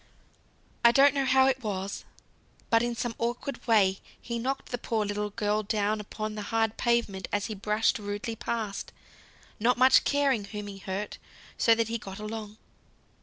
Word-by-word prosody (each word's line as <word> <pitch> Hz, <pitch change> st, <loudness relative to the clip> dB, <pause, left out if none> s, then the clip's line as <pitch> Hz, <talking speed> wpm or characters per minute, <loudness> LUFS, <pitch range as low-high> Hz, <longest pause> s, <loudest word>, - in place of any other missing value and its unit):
I 235 Hz, -, +8 dB
don't 275 Hz, +3 st, +6 dB
know 275 Hz, -1 st, 0 dB
how 265 Hz, 0 st, +5 dB
it 265 Hz, -1 st, +1 dB
was, 200 Hz, -3 st, -4 dB, 0.7 s
but 230 Hz, 0 st, +5 dB
in 240 Hz, 0 st, -1 dB
some 235 Hz, 0 st, -2 dB
awkward 240 Hz, +4 st, -3 dB
way 195 Hz, -4 st, +4 dB, 0.2 s
he 235 Hz, -1 st, -4 dB
knocked 270 Hz, +3 st, -3 dB
the 245 Hz, -, -2 dB
poor 220 Hz, -2 st, -1 dB
little 210 Hz, 0 st, -2 dB
girl 210 Hz, +1 st, 0 dB
down 210 Hz, 0 st, 0 dB
upon 215 Hz, +1 st, -5 dB
the 210 Hz, -, -5 dB
hard 225 Hz, +1 st, 0 dB
pavement 235 Hz, -6 st, 0 dB
as 205 Hz, -1 st, 0 dB
he 220 Hz, -, -4 dB
brushed 210 Hz, +2 st, +1 dB
rudely 205 Hz, +2 st, -4 dB
past, 220 Hz, -2 st, -4 dB, 0.7 s
not 240 Hz, +3 st, +3 dB
much 260 Hz, +1 st, +6 dB
caring 275 Hz, -7 st, +1 dB
whom 210 Hz, 0 st, -6 dB
he 200 Hz, -1 st, -8 dB
hurt, 195 Hz, +2 st, -5 dB, 0.4 s
so 230 Hz, -, +4 dB
that 225 Hz, -1 st, 0 dB
he 230 Hz, 0 st, -2 dB
got 195 Hz, -2 st, -8 dB
along. 215 Hz, 0 st, -6 dB
220 Hz, 170 wpm, -28 LUFS, 205-235 Hz, 0.7 s, I